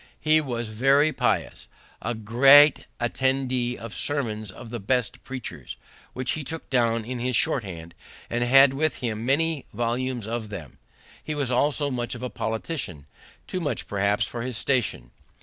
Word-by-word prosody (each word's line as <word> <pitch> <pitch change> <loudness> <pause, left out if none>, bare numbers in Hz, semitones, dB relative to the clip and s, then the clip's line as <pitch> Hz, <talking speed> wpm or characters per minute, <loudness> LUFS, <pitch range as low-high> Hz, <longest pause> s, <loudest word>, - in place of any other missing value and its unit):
He 155 0 +4
was 120 -5 -4
very 135 +7 +3
pious, - - -1 0.3
a 120 +1 -2
great 135 +7 +6
attender 130 0 0
of 115 -2 -8
sermons 110 -8 -1
of 110 +4 -10
the 120 - -4
best 125 +2 -1
preachers, 130 -3 -7 0.4
which 130 0 -2
he 155 - -3
took 160 +4 -6
down 115 -3 +2
in 125 +1 -4
his 125 +1 -1
short 140 -1 +1
hand, 85 -3 -8 0.3
and 120 +1 -1
had 135 +2 +6
with 155 +1 0
him 115 -3 -3
many 155 +1 +1
volumes 120 +1 -2
of 110 -1 -4
them. 85 -10 -9 0.4
He 155 - -4
was 140 -4 -1
also 145 +3 +1
much 120 -1 -3
of 120 - -8
a 125 - -3
politician; 110 - -4 0.4
too 185 - -4
much, 145 - -3
perhaps, 100 +1 +1
for 120 - -6
his 125 -1 -3
station. 105 - -1
125 Hz, 165 wpm, -25 LUFS, 110-135 Hz, 0.4 s, great